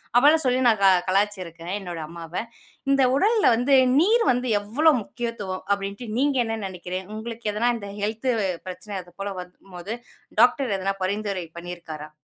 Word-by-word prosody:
அப்படிலாம் 295 +6 +6
சொல்லி 255 0 +2
நான் 220 -3 +4
க 195 - +8 0.2
கலாய்ச்சிருக்கேன், 185 -4 -1
என்னோட 175 -4 -6
அம்மாவ. 170 -1 -9 0.6
"இந்த 275 -1 +4
உடல்ல 430 +8 +3
வந்து, 250 +4 +3 0.2
நீர் 445 +7 +4
வந்து 250 0 -1
எவ்வளோ 290 +10 +3
முக்கியத்துவம்?" 210 -5 -5
அப்படின்ட்டு 200 +4 -2
நீங்க 280 +1 +2
என்ன 225 0 -2
நெனைக்கிறீங்க? 185 0 -5
உங்களுக்கு 220 0 -4
எதனா 230 +4 +2
இந்த 200 -3 -8
ஹெல்த் 220 +5 -1 0.4
பிரச்சன 185 +2 -6
அது 175 - -19
போல 200 0 -2
வரும் 180 0 -9 0.2
போது, 185 +6 -5 0.5
டாக்டர் 270 -9 +3
எதனா 195 +1 -1
பரிந்துரை 200 -2 -2
பண்ணியிருக்காரா? 170 -3 -7
205 Hz, 150 wpm, -24 LUFS, 185-245 Hz, 0.6 s, க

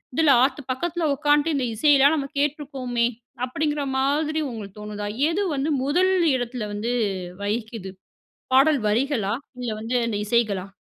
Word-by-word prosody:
இதுல 300 -3 +5
ஆத்து 285 +2 0
பக்கத்துல 335 +5 -1
உக்காந்துட்டு, 295 +2 +2
இந்த 265 -3 0
இசையெல்லாம் 285 +4 +5
நம்ம 275 -3 -3
கேட்ருக்கோமே, 270 -5 -1 0.4
அப்படிங்கிற 295 +3 -1
மாதிரி 300 +4 +1
உங்களுக்கு 210 -4 -8
தோணுதா? 210 0 -5 0.2
எது 395 +5 0
வந்து 280 +3 -1
முதல் 360 +7 +2 0.2
இடத்துல 245 -3 -3
வந்து 220 +4 -2 0.5
வகிக்குது 215 -2 -3 0.6
?பாடல் 275 +1 +5
வரிகளா? 225 -3 0 0.3
இல்ல 240 - -2
வந்து 235 +3 -1
அந்த 215 -3 -1
இசைகளா? 210 -4 +1
265 Hz, 135 wpm, -24 LUFS, 225-295 Hz, 0.6 s, இதுல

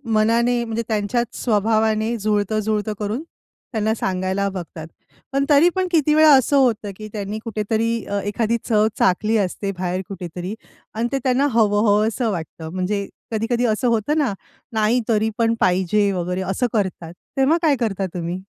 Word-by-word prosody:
मनाने, 235 +3 +2
म्हणजे 230 0 -3
त्यांच्याच 220 +2 0 0.2
स्वभावाने 220 0 +1
जुळतं-जुळतं 215 0 0
करून 215 +7 -3 0.5
त्यांना 220 -1 0
सांगायला 190 0 -1
बघतात. 170 -4 -7 0.5
पण 275 0 +2
तरी 295 +4 +6
पण 375 -1 0
किती 305 -3 +3
वेळा 310 -1 +7
असं 270 +2 +3
होतं, 230 -6 +2
की 215 - -7
त्यांनी 210 0 -4
कुठेतरी 225 +1 -1
अ, 200 0 -2
एखादी 220 +3 0
चव 215 -1 +4
चाखली 210 +4 +2
असते 195 0 -1
बाहेर 180 0 -1
कुठेतरी 180 +1 -6 0.4
आणि 230 +2 0
ते 275 - +1
त्यांना 260 +2 +2
हवं-हवसं 215 +1 +2
वाटतं. 160 -2 -6
म्हणजे 195 +2 -2 0.2
कधी-कधी 235 +2 0
असं 230 +3 +1
होतं 230 +6 +1
ना, 280 -9 +1 0.4
नाही 220 +3 +2
तरी 220 0 +2
पण 230 -1 +2
पाहिजे 190 +3 +2
वगैरे 180 0 -2
असं 245 +6 0
करतात. 185 -6 -2 0.2
तेव्हा 270 +5 +4
काय 310 -4 +3
करता 200 -5 -1
तुम्ही? 175 +1 -4
215 Hz, 150 wpm, -21 LUFS, 200-235 Hz, 0.5 s, वेळा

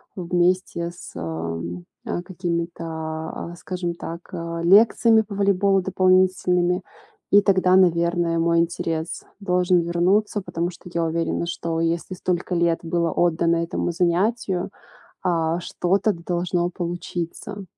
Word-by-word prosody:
вместе 175 -1 0
с, 175 - -11
э, - - -5
м, 85 +1 -4 0.2
а, - - -2
какими-то, 170 -2 -3
а, 160 +1 -5
скажем 180 -2 -3
так, 170 0 -7
а, 170 0 -4
лекциями 220 +4 +6
по 205 -1 -8
волейболу 200 -1 +3
дополнительными. 185 -1 +2 0.5
И 205 - +7
тогда, 185 -2 +3
наверное, 170 -2 +3
мой 170 0 +3
интерес 165 -1 -2 0.2
должен 180 -1 +2
вернуться, 185 +5 +1
потому 170 -2 -3
что 175 +1 -13
я 170 - 0
уверена, 165 +1 -1
что 165 -1 -3
если 165 +2 -1
столько 180 0 -2
лет 170 -1 +2
было 170 -1 0
отдано 170 0 +2
этому 170 +1 -1
занятию, 180 +2 0 0.5
а, 170 -2 0
что-то, 195 +4 +1
да 170 - -11
должно 175 0 0
получиться. 175 +3 -5
175 Hz, 130 wpm, -23 LUFS, 170-185 Hz, 0.5 s, И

